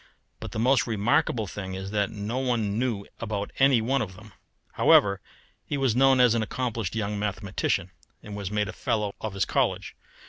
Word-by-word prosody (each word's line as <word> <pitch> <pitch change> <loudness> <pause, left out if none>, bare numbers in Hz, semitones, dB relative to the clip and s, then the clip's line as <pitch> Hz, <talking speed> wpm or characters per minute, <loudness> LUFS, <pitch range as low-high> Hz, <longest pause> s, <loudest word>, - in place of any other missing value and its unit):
But - - -7
the - - -5
most 125 +4 +3
remarkable 110 +1 +1
thing 95 0 -6
is 95 +1 -6
that 105 -2 +1
no 110 +3 -4
one 115 -5 0
knew 115 -6 -1
about 105 -3 -3
any 135 -3 +5
one 135 +5 +1
of 95 -3 -5
them. 105 0 -14 0.4
However, 100 -1 +4 0.4
he 145 - -3
was 135 -4 +1
known 135 0 +5
as 125 -2 +6
an 115 - +1
accomplished 115 -3 -3
young 105 -2 -2
mathematician, 105 -1 -2 0.3
and 105 - -8
was 100 -2 -4
made 105 0 0
a - - -6
fellow 105 -2 -1
of 110 -3 -4
his 100 - +1
college. - - -1
110 Hz, 185 wpm, -26 LUFS, 100-120 Hz, 0.4 s, as